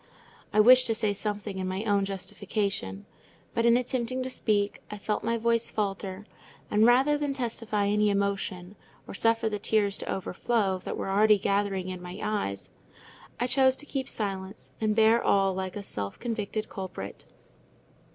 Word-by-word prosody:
I 215 Hz, -, +2 dB
wished 255 Hz, +4 st, +7 dB
to 225 Hz, -, +1 dB
say 210 Hz, -1 st, 0 dB
something 205 Hz, -1 st, -4 dB
in 185 Hz, -, -2 dB
my 190 Hz, +2 st, -2 dB
own 200 Hz, -3 st, +2 dB
justification; 195 Hz, -, -3 dB, 0.5 s
but 230 Hz, 0 st, +2 dB
in 235 Hz, 0 st, +6 dB
attempting 255 Hz, 0 st, -2 dB
to 260 Hz, -, -4 dB
speak, 205 Hz, -4 st, 0 dB
I 210 Hz, -, -6 dB
felt 210 Hz, +1 st, -2 dB
my 230 Hz, +1 st, 0 dB
voice 230 Hz, 0 st, +1 dB
falter; 195 Hz, -1 st, -3 dB, 0.5 s
and 215 Hz, +2 st, +5 dB
rather 270 Hz, +5 st, +4 dB
than 285 Hz, -2 st, -1 dB
testify 230 Hz, -4 st, -1 dB
any 210 Hz, +1 st, +3 dB
emotion, 200 Hz, -2 st, -2 dB, 0.3 s
or -, -, -7 dB
suffer 225 Hz, +2 st, +2 dB
the 210 Hz, -1 st, -2 dB
tears 205 Hz, -1 st, +1 dB
to -, -, -4 dB
overflow 195 Hz, +1 st, 0 dB
that -, -, -3 dB
were 195 Hz, -, -3 dB
already 210 Hz, +2 st, +5 dB
gathering 195 Hz, -1 st, 0 dB
in 185 Hz, -1 st, -6 dB
my 180 Hz, +2 st, -8 dB
eyes, 100 Hz, -, -3 dB, 0.7 s
I 245 Hz, -, +1 dB
chose 260 Hz, +1 st, +4 dB
to 295 Hz, -, -3 dB
keep 270 Hz, -2 st, -3 dB
silence, 195 Hz, -1 st, -5 dB
and 215 Hz, -1 st, +1 dB
bear 225 Hz, +1 st, +5 dB
all 195 Hz, -1 st, +3 dB
like 190 Hz, -1 st, -4 dB
a 205 Hz, -, -5 dB
self 100 Hz, -, -5 dB
convicted 215 Hz, -2 st, -3 dB
culprit. 185 Hz, -, -7 dB
210 Hz, 170 wpm, -28 LUFS, 195-230 Hz, 0.7 s, wished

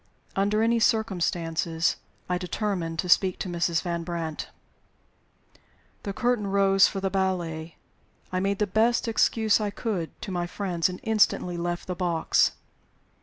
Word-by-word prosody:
Under 205 Hz, +3 st, +2 dB
any 230 Hz, +1 st, +3 dB
circumstances, 170 Hz, -7 st, 0 dB, 0.3 s
I 180 Hz, 0 st, 0 dB
determined 180 Hz, -3 st, -2 dB
to 180 Hz, -, -1 dB
speak 185 Hz, +1 st, +4 dB
to -, -, -4 dB
Mrs. 170 Hz, -1 st, 0 dB
Van 170 Hz, -1 st, -2 dB
Brandt. 165 Hz, -2 st, -4 dB, 1.5 s
The 200 Hz, -, -4 dB
curtain 240 Hz, 0 st, 0 dB
rose 195 Hz, -1 st, +5 dB
for 195 Hz, -, -4 dB
the 195 Hz, 0 st, -1 dB
ballet. 175 Hz, -4 st, -2 dB, 0.6 s
I 185 Hz, -, 0 dB
made 195 Hz, +1 st, 0 dB
the 210 Hz, -, +1 dB
best 225 Hz, +5 st, +2 dB
excuse 220 Hz, -1 st, +2 dB
I 210 Hz, -, 0 dB
could 200 Hz, -5 st, -4 dB
to 195 Hz, -, -5 dB
my 175 Hz, -1 st, -2 dB
friends, 180 Hz, -2 st, -1 dB
and 180 Hz, -, -7 dB
instantly 215 Hz, -5 st, +2 dB
left 175 Hz, 0 st, -3 dB
the 185 Hz, -, -3 dB
box. 175 Hz, -3 st, +2 dB
185 Hz, 145 wpm, -26 LUFS, 170-205 Hz, 1.5 s, rose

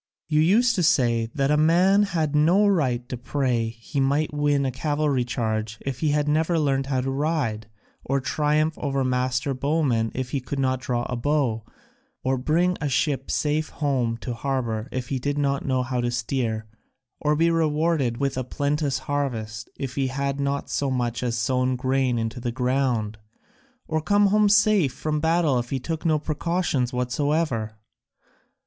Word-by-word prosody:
You 155 Hz, -1 st, +2 dB
used 230 Hz, +10 st, +4 dB
to -, -, +2 dB
say 120 Hz, -9 st, +2 dB
that 140 Hz, -1 st, +1 dB
a 150 Hz, -, +4 dB
man 180 Hz, +6 st, +4 dB
had 160 Hz, -7 st, 0 dB
no 170 Hz, +8 st, +4 dB
right 130 Hz, -11 st, +1 dB
to 125 Hz, -, -4 dB
pray 125 Hz, -2 st, -1 dB
he 115 Hz, +5 st, -5 dB
might 140 Hz, +3 st, +1 dB
win 145 Hz, -1 st, +1 dB
a 130 Hz, -, 0 dB
cavalry 145 Hz, 0 st, 0 dB
charge 110 Hz, -3 st, -2 dB
if 135 Hz, -2 st, -5 dB
he 155 Hz, -, +1 dB
had 150 Hz, 0 st, +1 dB
never 160 Hz, +3 st, +2 dB
learnt 135 Hz, -3 st, +1 dB
how 130 Hz, -2 st, 0 dB
to 135 Hz, +1 st, -2 dB
ride, 135 Hz, -7 st, -1 dB, 0.4 s
or 140 Hz, +1 st, 0 dB
triumph 150 Hz, +3 st, +1 dB
over 135 Hz, -2 st, -1 dB
master 130 Hz, +2 st, 0 dB
bowmen 130 Hz, -5 st, 0 dB
if 130 Hz, -1 st, -3 dB
he 140 Hz, -, 0 dB
could 130 Hz, +2 st, -5 dB
not 130 Hz, -1 st, 0 dB
draw 120 Hz, -2 st, -1 dB
a 125 Hz, -, -3 dB
bow, 125 Hz, -3 st, 0 dB, 0.6 s
or 130 Hz, 0 st, 0 dB
bring 170 Hz, +7 st, +1 dB
a 145 Hz, -, 0 dB
ship 135 Hz, 0 st, 0 dB
safe 150 Hz, +1 st, 0 dB
home 130 Hz, -6 st, -1 dB
to 125 Hz, -, -4 dB
harbour 120 Hz, -3 st, -2 dB
if 125 Hz, -1 st, -4 dB
he 135 Hz, -, -1 dB
did 145 Hz, +3 st, -2 dB
not 140 Hz, -1 st, 0 dB
know 130 Hz, -1 st, +1 dB
how 125 Hz, 0 st, -2 dB
to 120 Hz, -, 0 dB
steer, 115 Hz, -2 st, -2 dB, 0.5 s
or 150 Hz, 0 st, +1 dB
be 165 Hz, +2 st, +3 dB
rewarded 155 Hz, -5 st, +1 dB
with 135 Hz, -1 st, -1 dB
a -, -, -1 dB
plenteous 145 Hz, +1 st, -1 dB
harvest 115 Hz, -6 st, -3 dB
if 135 Hz, -2 st, -4 dB
he 135 Hz, -1 st, 0 dB
had 140 Hz, +1 st, -2 dB
not 140 Hz, 0 st, -1 dB
so 140 Hz, -, -1 dB
much 120 Hz, -2 st, -1 dB
as 120 Hz, -2 st, -1 dB
sown 130 Hz, +2 st, +1 dB
grain 130 Hz, -1 st, 0 dB
into 115 Hz, +2 st, -3 dB
the 120 Hz, 0 st, -3 dB
ground, 125 Hz, -4 st, 0 dB, 0.7 s
or 155 Hz, 0 st, -1 dB
come 205 Hz, +5 st, +3 dB
home 210 Hz, -1 st, +4 dB
safe 205 Hz, -8 st, +4 dB
from 150 Hz, -1 st, -2 dB
battle 160 Hz, -4 st, +2 dB
if 120 Hz, 0 st, -5 dB
he 135 Hz, -, -1 dB
took 160 Hz, +4 st, -4 dB
no 155 Hz, -1 st, +3 dB
precautions 155 Hz, -4 st, -1 dB
whatsoever. 125 Hz, -3 st, -1 dB
135 Hz, 180 wpm, -24 LUFS, 125-150 Hz, 0.7 s, used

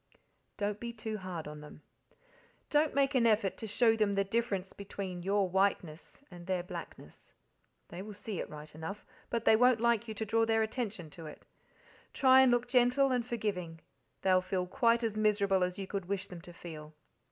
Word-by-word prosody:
Don't 205 Hz, 0 st, -2 dB
be 235 Hz, +1 st, -5 dB
too 220 Hz, -1 st, -5 dB
hard 180 Hz, -4 st, -6 dB
on 150 Hz, 0 st, -8 dB
them. 150 Hz, 0 st, -13 dB, 0.9 s
Don't 300 Hz, -1 st, +2 dB
make 280 Hz, 0 st, +2 dB
an 240 Hz, -3 st, +4 dB
effort 210 Hz, -3 st, +2 dB
to 220 Hz, -, -6 dB
show 225 Hz, +2 st, +3 dB
them 210 Hz, -2 st, +1 dB
the 200 Hz, -, +2 dB
difference 200 Hz, -2 st, -2 dB
between 195 Hz, -2 st, -6 dB
your 195 Hz, +1 st, +1 dB
whiteness 185 Hz, -, -1 dB
and 175 Hz, 0 st, -11 dB
their 185 Hz, -2 st, 0 dB
blackness. 180 Hz, -, -10 dB, 0.6 s
They 175 Hz, -, -7 dB
will 210 Hz, +1 st, -8 dB
see 205 Hz, -1 st, -5 dB
it -, -, -4 dB
right 150 Hz, 0 st, -10 dB
enough, 160 Hz, +7 st, -7 dB, 0.2 s
but 230 Hz, -1 st, -2 dB
they -, -, +7 dB
won't 250 Hz, 0 st, +4 dB
like 235 Hz, -1 st, +2 dB
you 220 Hz, -, -5 dB
to 220 Hz, -, -3 dB
draw 225 Hz, +2 st, +2 dB
their 225 Hz, 0 st, +2 dB
attention 220 Hz, -, -4 dB
to 165 Hz, 0 st, -10 dB
it. 150 Hz, -, -12 dB, 0.7 s
Try 260 Hz, -1 st, +6 dB
and 265 Hz, -, +6 dB
look 245 Hz, 0 st, +1 dB
gentle 250 Hz, +2 st, +3 dB
and 250 Hz, -2 st, +1 dB
forgiving 200 Hz, -8 st, -3 dB, 0.4 s
they'll 185 Hz, -1 st, +4 dB
feel 185 Hz, 0 st, -2 dB
quite 235 Hz, +3 st, +2 dB
as 220 Hz, -2 st, -1 dB
miserable 200 Hz, -3 st, +2 dB
as 180 Hz, 0 st, -2 dB
you 195 Hz, -, -4 dB
could 195 Hz, -1 st, -4 dB
wish 195 Hz, -1 st, -2 dB
them 180 Hz, -3 st, -10 dB
to 175 Hz, -, -12 dB
feel. 155 Hz, -3 st, -10 dB
205 Hz, 195 wpm, -32 LUFS, 180-230 Hz, 0.9 s, they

